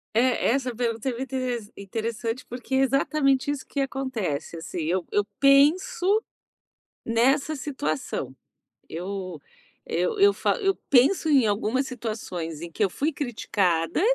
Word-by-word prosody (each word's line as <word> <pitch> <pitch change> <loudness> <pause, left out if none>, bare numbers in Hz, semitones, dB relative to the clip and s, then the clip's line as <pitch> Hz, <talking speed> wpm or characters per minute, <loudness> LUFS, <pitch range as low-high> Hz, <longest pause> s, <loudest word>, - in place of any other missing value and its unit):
É, 245 +1 +3
essa 255 -1 0
pergunta 230 +1 -1
é - - 0
muito 265 0 -5
interes 245 -5 -2
interessante, 225 +4 -4
porque 245 +2 -4
exatamente 275 +1 +2
isso 290 -2 -2
que 280 - -4
acontece, 260 - -2
assim, 165 +1 -5
eu 175 +3 0
eu 205 - +2
penso 335 +9 +4 0.8
nessa 270 +6 +2
situação. 155 - -3 0.5
Eu 185 +2 -5 0.5
eu 450 -3 -1
eu 405 +1 +6
fa - - +1
eu 390 0 +3
penso 280 +6 +4
em 275 -6 +5
algumas 215 +6 0
situações 185 - -5
em 170 - -6
que 215 - -2
eu 200 - +4
fui 295 - -1
criticada 195 - 0
245 Hz, 135 wpm, -25 LUFS, 200-275 Hz, 0.8 s, eu